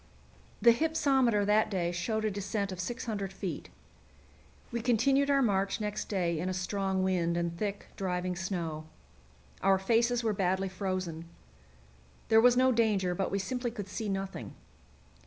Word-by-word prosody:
The 235 - +9
hypsometer 265 -7 +2
that 210 +1 +3
day 175 -4 -1
showed 215 +5 -2
a 215 - +1
descent 200 0 -2
of 185 - -6
600 205 -1 -3
feet. 190 -1 -5 1.0
We 235 -1 -2
continued 270 +4 +3
our 275 -1 +4
march 195 -2 +1
next 210 0 -3
day 175 -5 0
in 180 +3 -2
a 185 - -2
strong 190 +1 -1
wind 175 -2 +1
and 170 0 -1
thick, 200 +2 -3
driving 180 -1 -2
snow. 170 -4 -4 0.7
Our 195 0 +4
faces 235 +5 +2
were 220 -2 +1
badly 190 0 0
frozen. 185 -4 -3 1.0
There 220 0 +6
was 245 +1 +5
no 260 0 +5
danger, 210 -6 +2
but 190 +2 -1
we 195 - -1
simply 245 +5 -2
could 210 -4 -6
see 210 +2 -4
nothing. 195 - -4
195 Hz, 155 wpm, -30 LUFS, 185-230 Hz, 1.0 s, The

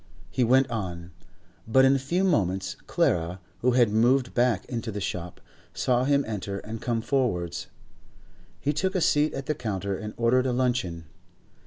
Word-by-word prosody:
He 130 - +1
went 130 +3 +4
on, 90 -6 -4 0.6
but 130 +4 +5
in 135 +1 +5
a - - +1
few 170 +8 0
moments 95 - +1
Clara, 85 +2 +1 0.2
who 125 +1 +2
had 120 -4 +4
moved 120 +4 +3
back 120 -4 +2
into 115 -2 -4
the 105 - -4
shop, 90 -3 -5 0.4
saw 125 0 +1
him 140 0 +2
enter 100 -2 -4
and 110 +2 -7
come 115 -2 -1
forwards. 115 - -1 0.9
He 145 - 0
took 185 +6 -1
a - - +3
seat 150 -1 +3
at 135 - -5
the 155 - 0
counter 100 -6 -3
and 105 +2 -7
ordered 125 +2 +3
a 125 - 0
luncheon. 120 -10 -1
120 Hz, 170 wpm, -26 LUFS, 100-130 Hz, 0.9 s, but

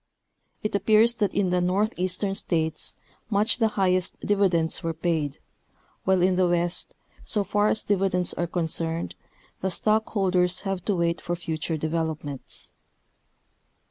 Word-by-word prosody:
It 215 - -2
appears 215 +3 +4
that 205 -3 +1
in 195 -3 0
the 180 0 +2
northeastern 185 +1 0
states 160 -4 +1 0.3
much 215 +2 +2
the 225 - +4
high 195 -4 +1
est 185 0 -2
dividends 185 -6 +2
were 165 -2 -3
paid, 160 -4 -1 0.7
while 190 -1 +3
in 185 0 +3
the 185 -1 +3
west, 175 0 -1 0.3
so 210 - +1
far 205 +2 +1
as 215 - 0
dividends 190 -3 +1
are 175 - -2
concerned, 165 -1 -2 0.5
the 190 - 0
stockholders 190 -3 +1
have 195 -3 -3
to 205 - +1
Avait 170 -2 0
for 175 - -2
future 160 -1 -3
develop 160 0 -2
ments. 140 -3 -5
180 Hz, 140 wpm, -25 LUFS, 170-200 Hz, 0.7 s, appears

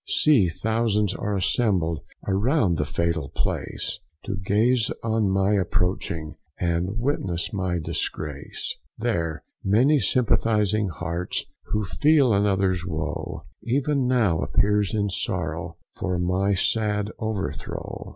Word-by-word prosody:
See 130 - +4
thousands 105 +1 +1
are 105 0 -2
assembled 90 -5 +1 0.3
Around 100 - +2
the 75 - +1
fatal 80 -1 -1
place, - - -2 0.2
To - - -3
gaze 110 +5 +2
on 110 -3 +1
my 95 +2 +2
approaching, 90 -3 -1 0.2
And 90 +4 0
witness 110 - -1
my 95 -3 0
disgrace. 75 -3 -3 0.2
There 85 -9 -1 0.2
many 125 +10 +4
sympathising 110 -4 +2
hearts, 85 +2 -3 0.2
Who 105 0 -1
feel 145 +3 +4
another's 95 -3 +2
woe, 80 -3 -4 0.2
Even 135 +1 +1
now 110 -10 +3
appears 105 -1 +2
in 100 -2 0
sorrow, 85 -3 -2 0.2
For 90 -2 -2
my 95 +3 +1
sad 105 +1 +1
overthrow. 110 -3 -4
100 Hz, 110 wpm, -25 LUFS, 90-110 Hz, 0.3 s, See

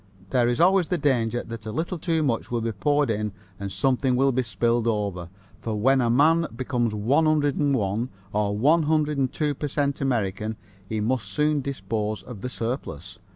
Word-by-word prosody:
There 125 -2 +3
is 120 0 0
always 185 0 +4
the 180 - 0
danger 120 -5 +1
that 115 -1 -8
a - - -3
little 170 - -3
too 160 0 0
much 120 -6 -1
will 120 -1 -1
be 115 0 -1
poured 145 +5 +1
in 105 -1 -2 0.3
and 100 -1 -4
something 130 +2 +1
will 135 +2 +3
be 130 +1 +1
spilled 120 0 0
over, 100 -6 -1 0.3
for 110 -1 -3
when 135 +4 +4
a 120 - +1
man 160 +7 +4
becomes 120 -3 -1
101 135 -3 +1 0.2
or 105 -1 0
102 150 0 +2
per 145 +2 -4
cent 140 0 -1
American 110 -4 -1 0.3
he 110 - -1
must 115 -1 -1
soon 150 +8 +1
dispose 110 -5 -3
of 120 -6 -9
the 125 - -3
surplus. 115 - -5
125 Hz, 170 wpm, -25 LUFS, 110-145 Hz, 0.3 s, always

